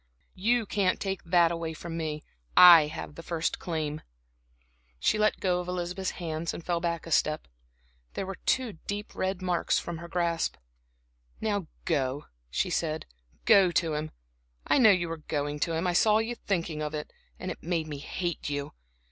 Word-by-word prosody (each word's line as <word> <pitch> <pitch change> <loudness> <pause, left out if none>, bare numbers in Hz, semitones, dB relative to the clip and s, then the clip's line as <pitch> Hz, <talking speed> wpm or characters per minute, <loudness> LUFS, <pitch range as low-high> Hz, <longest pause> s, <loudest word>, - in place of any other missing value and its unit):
You 225 +4 +1
can't 195 -2 +1
take 195 -2 -3
that 170 -1 +4
away 165 -1 -3
from 170 +1 -6
me 155 -2 -3 0.3
I 170 -4 +10
have 150 -1 -7
the 165 - -9
first 165 -1 -2
claim." 155 -3 -3 1.0
She 215 - +2
let 215 0 +2
go 180 -2 +1
of 180 - -5
Elizabeth's 180 +1 -2
hands 165 -1 -3
and 170 - -9
fell 175 -1 0
back 170 -1 -2
a 165 - -8
step. 155 0 +1 0.7
There - - -2
were 195 0 -6
two 240 -10 +1
deep 205 +1 -4
red 190 0 -2
marks 180 -2 +1
from 170 -2 -4
her 170 - -8
grasp. 170 -1 0 0.8
"Now 205 -5 -1 0.2
go," 140 -3 0 0.2
she 175 - -1
said, 160 -2 -1 0.4
"go 195 -4 +7
to 165 -2 +1
him. 155 +1 -2 0.6
I - - +3
knew 235 -4 +8
you 180 -4 +3
were 165 0 -4
going 145 -1 -3
to 165 - 0
him 165 +3 -1
I 180 - +1
saw 210 +4 +5
you 225 +2 -1
thinking 170 -8 -2
of 150 0 -3
it, 150 - -6 0.2
and 185 - -4
it - - -8
made 170 -1 -1
me 145 -2 -5
hate 175 +2 -3
you. 145 -1 -3
170 Hz, 180 wpm, -28 LUFS, 155-185 Hz, 1.0 s, I